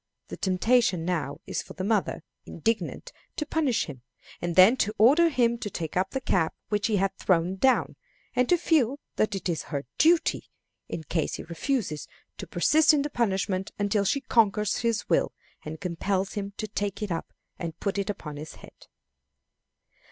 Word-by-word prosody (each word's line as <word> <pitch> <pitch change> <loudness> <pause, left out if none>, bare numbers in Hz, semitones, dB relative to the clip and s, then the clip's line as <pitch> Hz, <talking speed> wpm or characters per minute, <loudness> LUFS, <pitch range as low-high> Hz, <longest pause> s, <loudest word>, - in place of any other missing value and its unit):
The - - -6
temptation 190 -2 +2
now 160 -6 -2
is - - -2
for - - -11
the 185 - -5
mother, 200 -5 0 0.2
indignant, 225 - -2 0.2
to 300 - -2
punish 295 -5 +1
him, 135 -5 -9 0.4
and 175 -1 -2
then 190 +7 +8
to 215 -3 0
order 285 +11 +6
him 235 -5 +1
to 210 - -4
take 165 -5 -5
up 185 +1 +1
the 265 - -2
cap 180 -10 0
which 205 -1 +1
he 220 - +1
had 195 0 +1
thrown 180 0 +2
down, 260 +6 +2 0.4
and 250 0 +2
to 355 - +5
feel 290 -6 +2 0.2
that 215 -1 +1
it 195 - -3
is 170 -3 -2
her 140 -1 -3
duty, 330 +2 +3 0.4
in 160 - -4
case 160 +1 -1
he - - -7
refuses, 170 - -2 0.3
to - - -6
persist 310 0 +4
in 285 - +1
the 295 - -4
punishment 195 -5 0
until 205 0 +1
she 275 +8 +1
conquers 210 -4 +2
his 230 -1 -1
will, - - +2 0.3
and 155 +1 -7
compels 190 +1 -1
him 200 -1 -4
to 215 - -3
take 205 0 -3
it 205 - -3
up 165 - -3 0.3
and 165 -2 -5
put 200 0 -1
it 200 - -2
upon 150 -7 -5
his 155 +1 -8
head. - - -16
200 Hz, 180 wpm, -27 LUFS, 180-240 Hz, 0.4 s, then